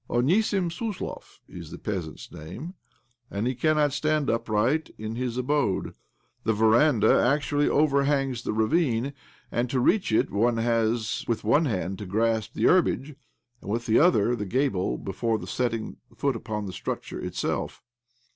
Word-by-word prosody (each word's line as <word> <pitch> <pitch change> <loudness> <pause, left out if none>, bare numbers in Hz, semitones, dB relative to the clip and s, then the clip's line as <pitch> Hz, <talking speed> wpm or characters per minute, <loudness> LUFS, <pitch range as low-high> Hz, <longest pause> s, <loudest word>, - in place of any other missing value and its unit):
Onisim 175 - +2
Suslov 215 +2 -6
is - - -9
the - - -8
peasant's 90 -7 -5
name, 95 - -8 0.6
and 100 +3 -3
he 130 - +1
cannot 150 +1 +2
stand 155 -1 +1
upright 115 +7 0
in 110 +1 -5
his 125 0 -3
abode. 125 -6 0 0.5
The 110 - +2
veranda 110 +2 +4
actually 145 +2 +2
overhangs 140 -3 +2
the - - -3
ravine, 120 +3 +1 0.4
and 120 +1 0
to 130 - 0
reach 185 - +2
it 110 - +2
one 115 +3 +2
has 115 -1 0
with 115 -2 -1
one 145 +9 +3
hand 95 -6 -2
to 105 - -6
grasp 110 +2 0
the - - -2
herbage, 155 -5 +3 0.5
and, - - -9
with 115 +3 -1
the 110 -1 +4
other, 125 - +4
the 105 -3 -4
gable 125 -4 0
before 110 +3 -2
setting 115 -3 -2 0.2
foot 140 -3 0
upon 105 -2 -4
the 95 - -6
structure - - -5
itself. - - -3
120 Hz, 150 wpm, -26 LUFS, 110-145 Hz, 0.6 s, veranda